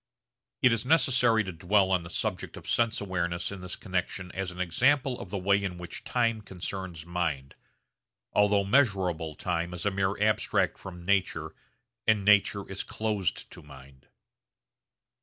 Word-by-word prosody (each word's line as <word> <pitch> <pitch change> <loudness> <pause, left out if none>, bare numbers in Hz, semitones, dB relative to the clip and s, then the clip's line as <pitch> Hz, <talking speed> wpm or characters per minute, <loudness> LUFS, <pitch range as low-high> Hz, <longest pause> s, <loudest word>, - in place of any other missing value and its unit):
It 125 -2 +6
is 115 -2 -1
necessary 125 -6 +4
to 95 - -5
dwell 95 +3 +2
on 90 -2 +3
the 85 - -9
subject - - -3
of - - -11
sense 115 -1 +2
awareness 85 -3 -2
in 100 -2 -7
this 90 -1 -5
connexion 95 -1 -3
as 95 -1 -3
an 90 0 -10
example 125 - +2
of - - -8
the 100 - -3
way 100 +2 +2
in 90 -2 -3
which 90 0 -7
time 115 -3 0
concerns 95 -4 -6
mind, 85 -6 -2 0.8
although 105 -1 +4
measurable 95 - +1
time 90 +1 -2
is 85 - -5
a 100 - +2
mere 95 +1 -1
abstract 105 +1 +1
from 90 -3 -9
nature 90 -5 0 0.5
and 105 -3 +3
nature 100 -1 +4
is 95 0 -4
closed 105 -4 -2
to - - -11
mind. 65 -2 -15
95 Hz, 160 wpm, -28 LUFS, 85-105 Hz, 0.8 s, It